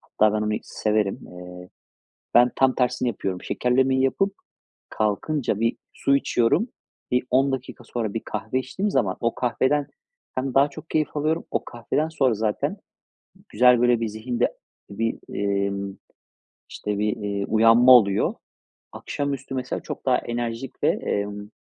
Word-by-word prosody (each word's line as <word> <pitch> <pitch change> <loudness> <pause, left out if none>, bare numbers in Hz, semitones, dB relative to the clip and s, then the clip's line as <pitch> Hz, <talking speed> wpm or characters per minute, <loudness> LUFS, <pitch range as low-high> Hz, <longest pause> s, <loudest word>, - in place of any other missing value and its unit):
Hatta 105 0 +2
ben 105 - 0
onu 105 0 0
severim. 105 -2 -1
Eee, 90 0 -10 0.7
ben 120 +1 +6
tam 130 -1 +3
tersini 125 0 +1
yapıyorum, 95 -4 -3
şekerlemeyi 130 +1 +1
yapıp 195 +9 +1 0.6
kalkınca 110 +2 -1
bir 115 0 +1 0.2
su 140 - +2
içiyorum. 140 - +2 0.4
Bir 125 0 +2
10 135 +2 +3
dakika 130 -2 -5
sonra 115 -3 -3
bir 115 - -2
kahve 120 +4 -2
içtiğim 190 - -2
zaman 100 -8 +1
o 115 0 0
kahveden 135 +3 +1 0.5
hem 130 0 -2
daha 140 +2 +5
çok 165 - -11
keyif 155 -1 0
alıyorum. 155 +3 0
O - - 0
kahveden 130 +7 -2
sonra 135 -7 +2
zaten 105 0 -1 0.7
güzel, 125 +2 +5
böyle, 120 -1 +4
bir 115 - 0
zihinde 120 +3 -1 0.4
bir, 115 +3 -2 0.2
emm, 100 -1 -1 0.7
işte, 105 -1 -4
bir, 105 0 0
eee, 100 -1 -2
uyanma 115 +3 +6
oluyor. 100 -6 +5 0.6
Akşamüstü 140 -2 -4
mesela 130 0 -3
çok - - -7
daha 125 -1 +4
enerjik 120 +1 -4
ve, - - +4
emm, 105 0 -2
120 Hz, 145 wpm, -24 LUFS, 105-130 Hz, 0.7 s, ben